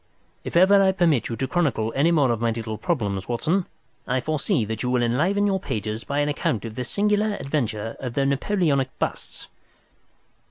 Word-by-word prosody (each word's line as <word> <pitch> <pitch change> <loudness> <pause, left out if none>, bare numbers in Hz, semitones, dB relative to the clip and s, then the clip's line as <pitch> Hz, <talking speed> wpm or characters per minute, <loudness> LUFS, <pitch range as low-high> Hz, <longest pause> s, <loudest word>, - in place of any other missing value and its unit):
If - - -6
ever 195 +3 +6
I 190 -1 +4
permit 165 -9 +2
you 115 - -3
to 135 - -2
chronicle 130 -9 0
any 145 +5 +3
more 145 -7 +3
of 115 -1 -2
my 115 - +2
little 110 -1 -4
problems, 105 - -2
Watson, 165 +10 0 0.4
I 130 +1 +1
foresee 155 - 0
that 110 +1 -4
you 125 - -1
will 125 -1 +2
enliven 170 +13 +1
your 195 -1 +1
pages 110 - -4
by 140 +1 -1
an 145 - +1
account 135 -6 -1
of 110 - -6
the 125 - -4
singular 210 - +1
adventure 115 - -3
of 125 -2 -5
the 140 - +2
Napoleonic 140 -2 0
busts." - - -4
135 Hz, 190 wpm, -24 LUFS, 115-175 Hz, 0.4 s, ever